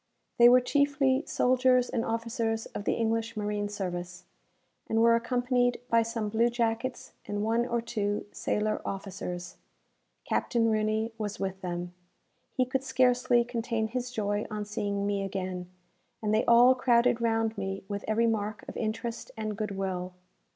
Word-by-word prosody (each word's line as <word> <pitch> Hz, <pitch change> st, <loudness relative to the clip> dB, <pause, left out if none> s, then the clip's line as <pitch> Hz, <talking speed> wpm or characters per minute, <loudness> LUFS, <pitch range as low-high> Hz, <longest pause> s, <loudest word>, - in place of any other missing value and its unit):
They 240 Hz, 0 st, +9 dB
were 250 Hz, +1 st, +7 dB
chiefly 280 Hz, 0 st, +2 dB
soldiers 255 Hz, 0 st, +3 dB
and 230 Hz, -, -1 dB
officers 225 Hz, -1 st, -2 dB
of 205 Hz, -, -7 dB
the -, -, +2 dB
English 225 Hz, -1 st, -1 dB
marine 210 Hz, -1 st, -2 dB
service, 180 Hz, -3 st, -5 dB, 0.7 s
and 225 Hz, -, +2 dB
were 230 Hz, 0 st, +6 dB
accompanied 245 Hz, +1 st, +1 dB
by 230 Hz, 0 st, +5 dB
some 230 Hz, -1 st, -2 dB
blue 230 Hz, +3 st, +3 dB
jackets 235 Hz, +1 st, -2 dB, 0.2 s
and 205 Hz, 0 st, -2 dB
one 230 Hz, +2 st, +1 dB
or 235 Hz, -1 st, 0 dB
two 210 Hz, -3 st, -2 dB
sailor 215 Hz, 0 st, -1 dB
officers. 180 Hz, -2 st, -5 dB, 0.7 s
Captain 230 Hz, -2 st, +1 dB
Rooney 215 Hz, +1 st, 0 dB
was 210 Hz, -1 st, -4 dB
with 190 Hz, 0 st, -3 dB
them. 175 Hz, -1 st, -4 dB, 0.6 s
He 255 Hz, -, +1 dB
could 265 Hz, +1 st, -2 dB
scarcely 250 Hz, -2 st, +3 dB
contain 230 Hz, -2 st, -2 dB
his 250 Hz, +1 st, -3 dB
joy 205 Hz, -3 st, -1 dB
on 210 Hz, -1 st, -4 dB
seeing 200 Hz, -1 st, -2 dB
me 200 Hz, -1 st, 0 dB
again; 185 Hz, -2 st, -4 dB, 0.5 s
and 215 Hz, -1 st, -1 dB
they 215 Hz, -, +2 dB
all 240 Hz, +2 st, +7 dB
crowded 240 Hz, -2 st, +3 dB
round 225 Hz, -1 st, +1 dB
me 195 Hz, -1 st, -4 dB
with 200 Hz, 0 st, -4 dB
every 220 Hz, +2 st, +2 dB
mark 215 Hz, -1 st, -1 dB
of -, -, -8 dB
interest 230 Hz, +1 st, -3 dB
and 215 Hz, -1 st, -3 dB
good 215 Hz, +1 st, -3 dB
will. 185 Hz, -2 st, -3 dB
225 Hz, 155 wpm, -29 LUFS, 205-240 Hz, 0.7 s, They